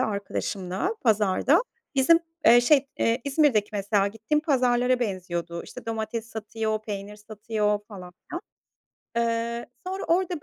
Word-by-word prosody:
arkadaşımla 200 - -2
pazarda. 220 - +3 0.3
Bizim, 280 +5 +5 0.3
eee, 240 +1 +9
şey, 275 +2 +4
eee, 230 +2 +2
İzmir'deki 275 -7 +3
mesela 200 0 +1
gittiğim 225 +8 -1
pazarlara 250 -4 +2
benziyordu. 175 -5 -3
İşte, - - -11
domates 225 0 -3
satıyor, 220 0 -3
peynir 205 -1 -6
satıyor 210 0 -1
falan 180 -4 -10 0.2
filan. 345 - -4 0.8
Eee, 235 0 -1 0.2
sonra 380 +1 -3
orada, 350 -2 0
225 Hz, 120 wpm, -26 LUFS, 205-255 Hz, 0.8 s, eee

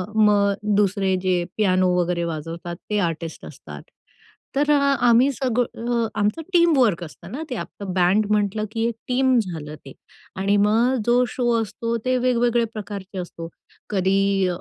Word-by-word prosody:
मग 205 -2 +4 0.2
दुसरे 195 -2 +1
जे 180 -2 +1
पियानो 185 -3 +2
वगैरे 175 0 -1
वाजवतात 165 +1 -5
ते 210 - 0
आर्टिस्ट 165 0 -7
असतात. - - -10 0.7
तर 295 +1 +2
अ - - +5 0.3
आम्ही 240 +4 +5
सगळं 240 -2 -1
आमचं 210 +10 0
टीम 340 -4 +4
वर्क 205 -9 +2
असतं 155 - -11
ना, 300 +6 -5
ते 250 - -3
आपलं 200 -3 -6
बँड 190 +4 +3
म्हंटलं 210 0 0
की 225 0 -1
एक 235 - -3
टीम 255 0 +2
झालं 160 -7 -5
ते 135 - -10 0.4
आणि 195 +2 +1
मग 225 +5 +3
जो 245 +1 +4
शो 240 -2 -1
असतो, 230 +2 -3
ते 255 0 +2
वेगवेगळ्या 240 -1 +1
प्रकारचे 200 -2 -7
असतो. 170 -2 -7 0.4
कधी 195 0 +1
210 Hz, 150 wpm, -22 LUFS, 185-240 Hz, 0.7 s, अ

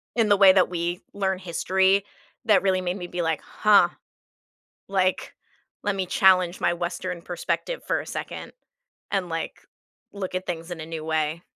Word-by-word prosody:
in 225 -3 +3
the 205 - +6
way 195 -1 +8
that 185 -2 +4
we 175 0 -2
learn 190 -2 0
history 190 +3 +2 0.4
that 210 -3 +4
really 185 -1 +2
made 180 +2 -2
me 175 -1 -6
be 175 0 -3
like, 160 -2 -1
"Huh, 210 -1 +4 1.0
like, 185 -1 0 0.5
let 205 -1 0
me 190 -1 -1
challenge 185 -1 +4
my 170 - +2
Western 175 0 -4
perspective 180 - -3
for - - 0
a - - -9
second - - -6 0.6
and, 190 -3 -1
like, 165 0 -5 0.5
look 190 -2 -5
at 185 +1 -3
things 165 0 -5
in 170 -2 -5
a 155 - -6
new 160 -1 -6
way." 160 +1 -1
185 Hz, 170 wpm, -25 LUFS, 170-190 Hz, 1.0 s, way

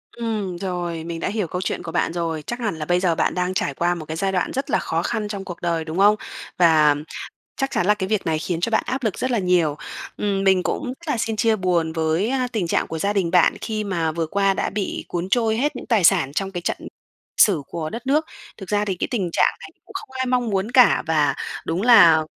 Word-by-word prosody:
Ừm, 215 -6 -3
rồi, 175 -3 -3
mình 165 0 -5
đã - - -2
hiểu 205 -3 -2
câu 180 +3 -4
chuyện - - -3
của 165 - -6
bạn 165 - 0
rồi. 165 -2 -2
Chắc 240 +1 -4
hẳn 210 -7 -2
là 155 -1 -5
bây 175 +2 +2
giờ 175 -3 +1
bạn - - +1
đang 180 +1 -1
trải 145 - -1
qua 175 +5 0
một 160 -3 -7
cái 160 +1 -5
giai 195 +2 0
đoạn 180 -2 -1
rất 270 +1 -3
là - - +2
khó 165 - -1
khăn 210 -1 -2
trong 200 -2 -5
cuộc 175 -3 -8
đời, 170 -2 -1
đúng 160 +2 -5
không? 205 +2 +6 0.4
Và 155 -4 +5 0.6
chắc 270 0 -1
chắn 180 - 0
là 210 - +5
cái 190 -2 -4
việc 215 -2 -1
này 160 -1 +1
khiến 165 +1 -3
cho 205 - 0
bạn 220 - +2
áp 260 +1 -2
lực 215 - -1
rất 255 - -1
là 235 - +1
nhiều. 180 -6 +2 0.4
Ừm, 200 -1 -1
mình 190 -2 +4
cũng 285 - -2
rất 285 +6 -7
là 280 - +1
xin 225 -1 -1
chia 220 +1 +2
buồn 175 -4 0
với, 160 +5 0
á, 255 -1 0
tình 205 -6 -1
trạng - - 0
của 160 - -5
gia 200 +5 0
đình 185 -5 0
bạn 180 -1 +4
khi 215 -1 -3
mà 170 -5 -1
vừa 165 0 -2
qua 195 +3 +1
đã - - -1
bị 200 -1 -3
cuốn 175 +1 -3
trôi 220 0 +2
hết 290 +5 0
những - - -8
tài 220 -7 +2
sản 165 -7 +4
trong 195 +5 -2
cái 175 - -3
trận - - -2 0.6
sử 180 -9 +5
của 155 -2 -4
đất 230 +3 -7
nước. 300 +3 +2 0.3
Thực 195 -3 -10
ra 210 0 +1
thì 195 - -1
cái - - -2
tình 195 -8 -1
trạng - - +3
này - - -10
cũng - - -16
không - - -6
ai 260 - 0
mong 250 -2 0
muốn 195 +2 -1
cả, 250 -1 +5
và 150 -4 +2 0.3
đúng 170 +4 -1
là 170 -10 +7
190 Hz, 265 wpm, -22 LUFS, 165-220 Hz, 0.6 s, là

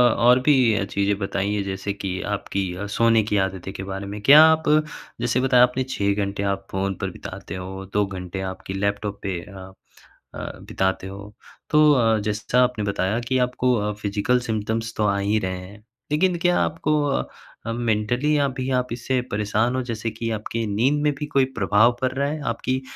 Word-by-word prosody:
और 125 +2 +5
भी 125 -8 +4
चीज़ें 100 0 +1
बताइए, 100 +1 -1
जैसे 95 +1 -3
कि 95 -1 -4
आपकी 95 -2 -3
अ, 100 +3 -5
सोने 115 +1 +3
की 105 0 0
आदतें 95 0 -7
के 95 - -6
बारे 95 +1 -5
में। 105 +1 -6
क्या 145 +7 +9
आप, 160 0 +4 0.6
जैसे 120 +1 +1
बताया 125 -1 +5
आपने 125 +1 +1
6 100 -5 0
घंटे 100 0 -4
आप 95 0 -8
फ़ोन 95 0 -1
पर - - -1
बिताते - - -8
हो, 95 +1 -6
2 105 0 +2
घंटे 95 -1 -6
आपके 95 - -8
लैपटॉप 100 +1 -2
पे 95 -3 -2
अ 95 -2 -11 0.6
अ, - - -6 0.3
बिताते 95 0 -1
हो, 100 +2 -9 0.4
तो 150 0 +5
अ, 115 -4 +3
जैसा 110 +4 +1
आपने 125 -4 -1
बताया 100 +2 0
कि 130 - +1
आपको 125 0 0
अ, 105 -1 -1
फिज़िकल 105 +5 +1
सिम्पटम्स 110 -1 -2
तो 105 - +1
आ 100 0 +1
ही 100 +2 +1
रहे 95 0 -3
हैं, 95 +3 -11 0.3
लेकिन 175 +4 +2
क्या 175 0 +2
आपको 155 -1 0 0.2
अ 135 - 0 0.4
अ, - - -1
मेंटली 120 +5 0
अभी 130 -1 -2
आप 125 - -3
इससे 125 +2 -1
परेशान 105 +4 0
हो, 130 - 0
जैसे 115 -2 -4
कि 115 +1 -4
आपकी 110 +1 -3
नींद 135 +8 +2
में 150 - +3
भी 150 - -2
कोई 140 -2 +3
प्रभाव 105 +4 +4
पड़ 130 -1 +1
रहा 140 +1 0
है? 155 +1 -4
आपकी 130 +3 -2
110 Hz, 190 wpm, -23 LUFS, 100-125 Hz, 0.6 s, क्या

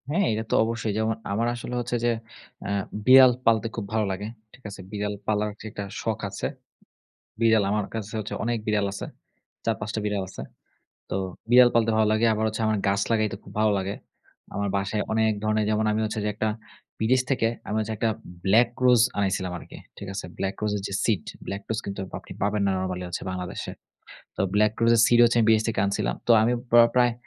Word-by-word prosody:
হ্যাঁ, 180 +6 +2
এটাতো 110 +1 -2
অবশ্যই। 115 -1 -2
যেমন 110 +1 0 0.2
আমার 115 +4 0
আসলে 120 +1 -7
হচ্ছে 120 0 -2
যে, 120 - +3 0.6
আ - - -3 0.4
বিড়াল 130 0 +9
পালতে 115 -1 +3
খুব 110 - -4
ভালো 110 -1 +2
লাগে। 100 +2 -4 0.3
ঠিক 130 - -18
আছে? 100 - -9
বিড়াল 105 0 -2
পালার 105 0 +1
যেটা 105 -2 -6 0.2
শখ 110 -1 -2
আছে। - - -3 0.9
বিড়াল 110 -2 +4
আমার 105 -1 0
কাছে 110 -1 -5
হচ্ছে 110 - -5
অনেক 120 +1 0
বিড়াল 105 -1 +2
আছে। 100 - -5 0.6
৪-৫ 105 - -1
টা - - 0
বিড়াল 105 -2 -1
আছে। - - -9 0.7
তো - - -4 0.4
বিড়াল 125 0 +8
পালতে 115 -1 +3
ভালো 110 0 +4
লাগে। 110 +2 +3
আবার 110 0 -1
হচ্ছে, 110 +1 -3
আমার 110 -1 +1
গাছ 100 0 +1
লাগাইতে 110 -3 +1
খুব - - -12
ভালো 110 -1 +3
লাগে। 95 +1 -3 0.6
আমার 100 0 -1
বাসায় 100 +2 -1
অনেক 110 0 +3
ধরনের 110 0 +1
যেমন 110 0 +1
আমি 110 - 0
হচ্ছে 110 0 -2
যে - - 0
একটা 110 +1 -1 0.5
বিদেশ 125 +4 +3
থেকে 120 -4 +2 0.2
আমি 105 - -1
হচ্ছে 110 +1 -3
একটা 115 - +1 0.4
ব্লাক 110 +5 +5 0.2
রোজ 125 -2 +6 0.2
আনাইছিলাম 95 -2 0
আরকি। - - -12 0.2
ঠিক 100 - -8
আছে? 95 - -4
ব্লাক 95 0 -1
রোজের 105 -1 0
যে - - -8
সিড, 110 -5 +1 0.2
ব্লাক 100 +1 -4
রোজ 110 - -1
কিন্তু 100 -1 -4 0.2
আপনি - - -12
পাবেন 105 0 +1
না - - +2
নরমালি 95 -1 -3
হচ্ছে 90 - -5
বাংলাদেশে। 90 -1 -5 0.7
তো - - -5
ব্লাক 105 0 +4
রোজের 115 0 +5
সিড 120 - +4
হচ্ছে 120 0 +3
আমি 115 - +3
বিদেশ 110 -1 +4
থেকে 110 -4 0
আনছিলাম। 100 - -1
তো - - 0
আমি 115 +2 +2 0.2
প্র 120 - +6 0.2
প্রায় 125 -1 +4
110 Hz, 200 wpm, -25 LUFS, 100-115 Hz, 0.9 s, বিড়াল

